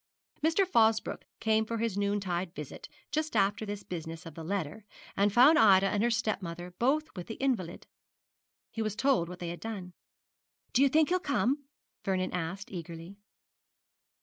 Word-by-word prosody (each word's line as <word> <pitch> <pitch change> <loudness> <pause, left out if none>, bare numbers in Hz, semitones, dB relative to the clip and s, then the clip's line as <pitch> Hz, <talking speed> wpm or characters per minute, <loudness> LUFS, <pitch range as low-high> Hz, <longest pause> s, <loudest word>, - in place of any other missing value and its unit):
Mr. 330 +5 +3
Fosbroke 225 -9 +2
came 220 0 +2
for 230 +1 -3
his 225 -3 -1
noontide 195 -4 -1
visit 150 -2 -8 0.2
just 310 -2 -1
after 205 +1 +2
this 205 0 -5
business 165 -1 -6
of 165 - -8
the 165 - -8
letter, 195 +2 -3 0.3
and 205 +1 +3
found 270 +8 +7
Ida 195 -4 +7
and 205 - 0
her 235 - +3
stepmother 180 -6 -2
both 295 +6 +1
with 180 -2 -6
the 225 - -5
invalid. 225 -11 -2 0.9
He 225 - -4
was 215 -2 -1
told 215 -9 +2
what 180 - -7
they 175 -1 -5
had 170 - -6
done. 195 -5 -6 0.8
'Do 250 - +4
you 280 - +6
think 310 +3 +4
he'll 365 +1 +2
come?' 280 -3 0 0.4
Vernon 185 -1 -1
asked, 180 +3 -4
eagerly. 170 +1 -7
205 Hz, 165 wpm, -30 LUFS, 180-235 Hz, 0.9 s, found